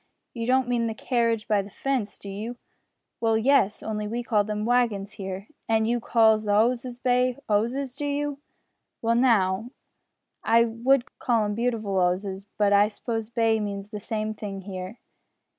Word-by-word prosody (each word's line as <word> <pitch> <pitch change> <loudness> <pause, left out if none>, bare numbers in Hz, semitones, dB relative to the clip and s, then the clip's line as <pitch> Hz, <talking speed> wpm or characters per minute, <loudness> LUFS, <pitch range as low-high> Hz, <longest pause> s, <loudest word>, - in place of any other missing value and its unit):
"You 230 -1 -4
don't 260 0 +3
mean 240 -1 +1
the 225 - -3
carridge 230 -2 0
by 210 -2 +3
the 200 - -10
fence, 250 -2 -2
do - - -11
you?" 215 +5 -5 0.6
"Well, 225 -1 +2
yes, 225 -3 +3
only 210 -1 -3
we 235 +3 -3
call 215 -3 +2
them 210 0 -3
wagons 230 -5 +1
here." 195 -1 -6 0.2
"An' 220 -1 +3
you 240 +2 +1
calls 220 -2 +3
the 205 - +1
'osses 240 +3 +1
bay 250 0 +1
'osses, 245 +5 0
do 290 - -4
you?" 290 0 -2 0.6
"Well 230 +1 +3
now, 225 -3 +2 0.7
I 230 +1 +5
would 240 +3 0
call 230 -3 +2
'em 205 - -1
beautiful 220 -4 -1
'osses, 190 +2 -1
but 205 -1 +3
I 205 +1 +6
suppose 225 0 -4
bay 225 -1 +2
means 200 0 -5
the 210 - -5
same 215 +1 -3
thing 200 -2 -6
here. 190 +2 -7
225 Hz, 170 wpm, -26 LUFS, 205-240 Hz, 0.7 s, I